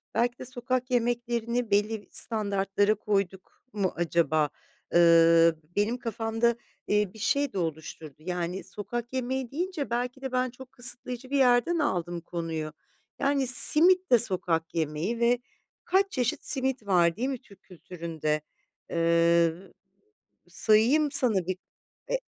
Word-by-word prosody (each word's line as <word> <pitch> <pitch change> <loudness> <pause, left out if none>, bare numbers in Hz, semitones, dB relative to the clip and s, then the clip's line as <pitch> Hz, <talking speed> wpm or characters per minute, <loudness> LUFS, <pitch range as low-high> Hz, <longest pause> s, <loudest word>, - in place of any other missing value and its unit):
belki 240 +1 0
de - - -7
sokak 255 +1 -3
yemeklerini 240 -1 -1
belli 205 +1 0
standartlara 205 -1 0
koyduk 195 -3 -3
mu 200 -3 -1
acaba? 165 -3 +1 0.4
Iıı, 165 -1 +6 0.2
benim 210 +4 0
kafamda, 230 0 -1 0.3
eee, 210 -2 +1
bir 220 - -13
şey 280 +6 0
de - - -5
oluşturdu. 160 -3 -5
Yani 180 +2 -4
sokak 235 +4 -6
yemeği 260 -1 -3
deyince 340 -1 -3
belki 245 +2 -3
de 265 -1 -5
ben 255 0 0
çok 255 +1 -13
kısıtlayıcı 245 0 -2
bir 280 - 0
yerden 255 +6 +3
aldım 175 - -2
konuyu. 165 -3 -5 0.5
Yani, 275 -1 +1
simit 355 +8 +5
de 245 - +7
sokak 175 -6 0
yemeği 165 +8 -2
ve 240 +1 +3 0.5
kaç 390 +2 +2
çeşit 245 -3 -2
simit 265 -4 -2
var 170 -3 +3
değil 250 +6 -2
mi 265 -3 -4
Türk 200 - -20
kültüründe? 165 -4 -4 0.5
Eee, 170 0 +3 1.0
Sayayım 245 +8 +3
sana 210 -11 +3
bir 185 0 -2 0.5
E, - - +1
220 Hz, 130 wpm, -27 LUFS, 175-250 Hz, 1.0 s, de